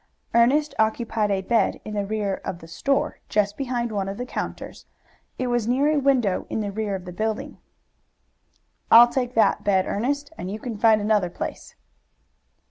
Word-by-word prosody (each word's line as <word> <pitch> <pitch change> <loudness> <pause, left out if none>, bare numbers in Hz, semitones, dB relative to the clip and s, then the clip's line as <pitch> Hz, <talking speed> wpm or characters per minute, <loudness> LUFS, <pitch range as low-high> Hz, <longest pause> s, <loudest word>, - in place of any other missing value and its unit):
Ernest 275 +6 +3
occupied 220 -1 +1
a 195 -1 0
bed 230 +4 +1
in 215 - -6
the 205 -1 -2
rear 205 -2 -2
of 175 - -4
the 165 - -13
store, 275 - -1
just 205 -1 +1
behind 245 -4 -2
one 195 -2 -2
of 195 - -6
the 245 - -4
counters. - - -6 0.5
It 255 - -2
was 240 -3 0
near 270 +5 +2
a 305 - +2
window 255 -9 +1
in - - -2
the 205 -1 -3
rear 210 -1 -2
of 185 -1 -7
the 180 - -8
building. 220 +3 -3 1.3
"I'll 240 +1 +9
take 250 0 -2
that 225 - +3
bed, 190 -2 +2
Ernest, 280 +7 -2
and 180 - -5
you 205 - -4
can 230 +1 -6
find 220 0 +4
another 205 -3 +1
place." - - -7
220 Hz, 180 wpm, -24 LUFS, 200-245 Hz, 1.3 s, I'll